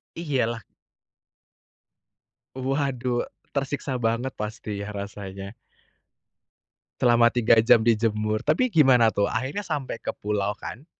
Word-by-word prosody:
Iyalah. 125 -9 -1 1.9
Waduh, 130 -2 -1 0.2
tersiksa 140 -1 -2
banget 115 +3 0
pasti 105 -1 -5
ya 100 +1 -6
rasanya. 100 0 -7 1.5
Selama 120 -1 +5
3 115 -1 +4
jam 110 0 +5
dijemur. 110 -1 +1
Tapi 255 -2 +2
gimana 130 - +5
tuh 100 0 +1
akhirnya 135 - -3
sampai 135 -5 -3
ke - - -5
pulau 105 0 -2
kan? 130 +7 -9
115 Hz, 105 wpm, -25 LUFS, 105-130 Hz, 1.9 s, Selama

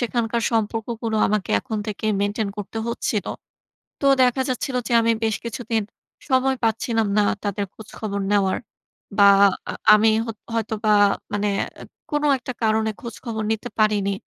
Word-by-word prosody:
সেখানকার 235 -1 -1
সম্পর্কগুলো 225 +1 -1
আমাকে 210 -2 -1
এখন 220 -5 -4
থেকেই 215 +1 -2
মেইনটেইন 205 +1 -1
করতে 205 +2 -5
হচ্ছিল, 220 -3 -2 0.8
তো 280 - -1 0.2
দেখা 250 +1 +3
যাচ্ছিল 255 +1 -2
যে - - -5
আমি 230 0 +3
বেশ 220 -1 +1
কিছুদিন 230 -2 -2 0.5
সময় 265 0 +3
পাচ্ছিলাম 225 0 +1
না 210 - +5 0.2
তাদের 205 0 -2
খোঁজখবর 210 -2 -6
নেওয়ার 195 -2 +2 0.6
বা 200 - +7 0.5
আ - - -6 0.2
আমি 215 +1 +5 0.2
হত 225 -2 -6 0.2
হয়তোবা 220 -1 0 0.4
মানে 205 0 0 0.3
অ্যা - - -11 0.3
কোন 295 0 0
একটা 255 0 -6
কারণে 220 0 +2
খোঁজখবর 230 -1 -5
নিতে 225 +2 -3
পারিনি। 205 -2 +2
220 Hz, 145 wpm, -22 LUFS, 210-235 Hz, 0.8 s, বা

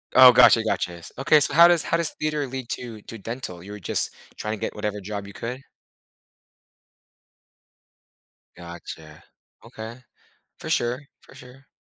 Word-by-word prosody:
Oh, 130 -1 +10
gotcha, 115 -2 +6
gotcha. 90 -5 -1
S 85 - -11
okay, 150 +3 +5
so 145 -1 +1
how 170 +2 +9
does 175 -2 +3
how 165 - 0
does 170 -2 0
theater 150 -2 -1
lead 130 -1 -6
to 115 -4 -6
to 115 - -9
dental? 105 -5 -7
You 100 - -10
were 105 - -8
just 90 - -2 0.2
trying 105 +1 -3
to - - -17
get - - -3
whatever 105 -1 -3
job 100 +1 -5
you 100 - -11
could? 125 +3 -6 2.9
Gotcha. 85 -3 -10 0.4
Okay. 115 +4 -9 0.6
For - - -7
sure, 120 +3 0 0.2
for - - -18
sure. 130 +2 -15
115 Hz, 160 wpm, -24 LUFS, 100-135 Hz, 2.9 s, Oh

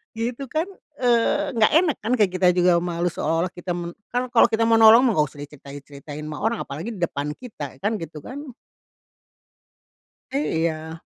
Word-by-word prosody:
Gitu 235 +4 -3
kan, 315 +8 -2 0.3
eee, 240 0 +2
nggak 215 -1 +4
enak 325 -2 +3
kan 235 - +1
kayak 210 -6 +3
kita 185 0 +3
juga 180 -1 +4
malu 175 0 -1
seolah-olah 165 +2 -1
kita 175 0 -5
men 170 0 -6 0.2
kan 250 +1 -1
kalau 240 -1 +6
kita 220 - 0
mau 225 0 +4
nolong 225 +1 +8
mah 240 -7 +2
enggak 150 - +4
usah 145 0 -12
diceritai-ceritain 145 0 -10
ama 155 0 -6
orang 225 +1 -1
apalagi 165 +12 -6
di 195 - -10
depan 150 -3 -2
kita, 150 - -9
kan 215 +2 0
gitu 165 -4 -8
kan. 275 - -8 1.8
Iya. 160 - -2
180 Hz, 170 wpm, -23 LUFS, 155-235 Hz, 1.8 s, nolong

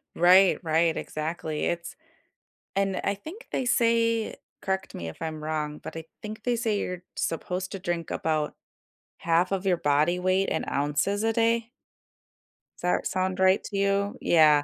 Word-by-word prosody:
Right, 185 +2 +6
right, 160 0 +2
exactly, 155 0 -3
it's 170 0 -3 0.8
And 195 -1 0
I 200 - +1
think 320 - -10
they 265 - 0
say- 230 -2 +2 0.3
correct 190 0 -2
me 85 - -5
if 80 - -10
I'm 155 -1 -4
wrong- 150 -1 -2
but - - -7
I 160 - -6 0.2
think 215 0 -7
they 245 -1 +1
say 220 -3 0
you're 180 -2 -4
supposed 180 +3 -2
to 195 - -4
drink 175 -3 -3
about 155 -2 -1 0.6
half 170 +3 +2
of 195 0 -1
your 185 -2 +4
body 150 +3 +2
weight 185 +1 +1
in 160 - -1
ounces 150 +9 0
a 225 - +2
day? 230 0 +1 1.1
Does - - -15
that 180 - +1
sound 185 0 -1
right 190 +1 +4
to 200 - -4
you? 200 +2 +1
Yeah. 150 -3 +5
185 Hz, 165 wpm, -27 LUFS, 160-200 Hz, 1.1 s, Right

